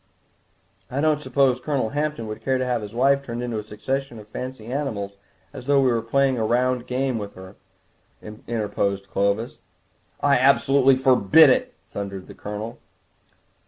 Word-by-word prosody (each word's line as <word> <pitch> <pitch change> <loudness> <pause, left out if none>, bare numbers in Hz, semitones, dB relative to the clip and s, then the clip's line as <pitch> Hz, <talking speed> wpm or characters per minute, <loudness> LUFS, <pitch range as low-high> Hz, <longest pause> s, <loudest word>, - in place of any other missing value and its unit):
"I 135 - -3
don't 150 0 +2
suppose 130 -1 +2
Colonel 135 -4 -1
Hampton 150 -4 -2
would 110 0 -7
care 130 -1 +1
to 130 - -1
have 125 -2 -1
his 105 +1 -8
wife 140 +3 +3
turned 120 -2 -5
into 120 -3 -3
a - - -6
succession 120 +4 -4
of 105 -1 -12
fancy 125 +1 -7
animals 115 -6 -3 0.4
as 125 - -9
though 140 -1 +4
we 130 -2 +3
were 115 -1 +1
playing 130 +2 +1
a - - 0
round 125 +2 +1
game 130 -1 -1
with 100 -1 -7
her," 95 +1 -11 0.6
interposed 105 -3 -3
Clovis. 100 +4 -1 0.6
"I 140 -2 +3
absolutely 135 0 +4
forbid 130 +3 +6
it," 255 -1 0 0.2
thundered 100 -2 -5
the - - -12
Colonel. 105 +2 -7
125 Hz, 160 wpm, -23 LUFS, 110-135 Hz, 0.6 s, forbid